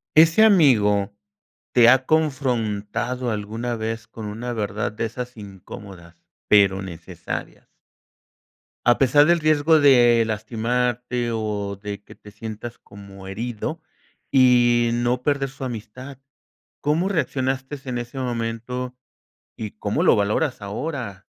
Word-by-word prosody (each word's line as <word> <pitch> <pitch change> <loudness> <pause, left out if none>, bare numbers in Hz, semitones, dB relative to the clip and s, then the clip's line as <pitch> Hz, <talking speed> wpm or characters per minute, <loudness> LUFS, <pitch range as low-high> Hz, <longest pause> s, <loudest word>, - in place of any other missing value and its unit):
Ese 165 +7 +6
amigo, 110 - +4 0.6
¿te 120 -2 +6
ha 130 0 +3
confrontado 125 -5 -1
alguna 110 +3 -3
vez 115 +1 -4
con 110 - -9
una 115 +4 -5
verdad 105 -1 -2
de 105 +2 -4
esas 125 +2 -6
incómodas, 95 -3 -11 0.3
pero 100 -2 +5
necesarias? 85 -4 -7 1.2
A 120 0 +5
pesar 140 +2 +5
del 170 +1 +3
riesgo 155 +1 +4
de 120 -4 +6
lastimarte, 120 +2 -1
o 105 -2 -3
de 105 -1 -6
que - - -15
te 105 - -15
sientas 110 +2 -8
como 100 -1 -13
herido 120 - -4 0.5
y 120 -2 +4
no 120 +1 0
perder 140 -1 0
su 135 +1 -10
amistad. 125 +3 -8 0.6
¿Cómo 155 +6 +1
reaccionaste 135 -5 -2
en 125 -1 -2
ese 120 +3 -6
momento 125 +1 -3 0.6
y 110 -2 -6
cómo 105 -1 -2
lo - - +5
valoras 105 +6 0
ahora? 105 -1 -5
120 Hz, 120 wpm, -22 LUFS, 105-130 Hz, 1.2 s, Ese